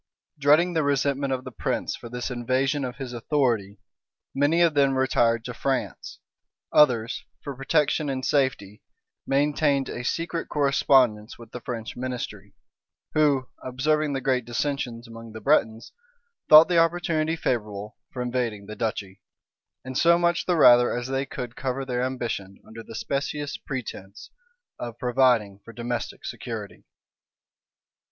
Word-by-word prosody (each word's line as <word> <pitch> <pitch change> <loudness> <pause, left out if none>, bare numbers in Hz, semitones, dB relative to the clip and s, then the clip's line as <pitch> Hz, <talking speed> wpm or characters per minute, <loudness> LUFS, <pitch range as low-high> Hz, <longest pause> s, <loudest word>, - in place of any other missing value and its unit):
Dreading 155 +5 +4
the 160 - +2
resentment 140 -1 0
of 130 -1 -2
the 130 - -8
prince - - -2
for 120 - -10
this 125 +2 -4
invasion 130 +4 0
of 125 -1 -4
his 130 -2 -7
authority, 115 -6 0 0.6
many 145 +5 +2
of 170 -2 +4
them 140 -2 +3
retired 115 -3 +2
to 125 - -5
France; 135 +2 -3 0.6
others, 120 -5 +3 0.2
for 140 -2 -5
protection 145 +2 +1
and 130 -1 -3
safety, 130 -8 0 0.5
maintained 140 -1 +1
a 120 - -5
secret 165 +5 -2
correspondence 130 -6 +2
with 115 - -13
the 125 - -7
French 115 -3 -5
ministry, 125 0 -6 0.6
who, 145 -4 +2 0.2
observing 145 +4 0
the 135 - -2
great 130 -1 +1
dissensions 120 -1 -3
among 115 -1 -11
the 110 - -7
Bretons, 115 -5 +1 0.6
thought 155 +1 +10
the 175 -2 +3
opportunity 165 -1 +1
favorable 105 -8 -3 0.2
for 125 - -4
invading 120 -5 -2
the 105 +1 -8
duchy; 100 -4 -4 0.6
and 130 0 -6
so 170 +5 +5
much 175 0 +1
the 180 - +3
rather 120 -4 +7
as 120 +1 -4
they 135 +1 -1
could 120 -1 -6
cover 135 0 -3
their 125 -1 -2
ambition 120 -7 -3
under 115 +1 -10
the 115 - -11
specious 145 +4 -3
pretence 110 -7 -7 0.5
of 120 -1 -6
providing 120 -6 +2
for - - -11
domestic 120 +1 -4
security. - - -7
130 Hz, 145 wpm, -25 LUFS, 120-145 Hz, 0.6 s, thought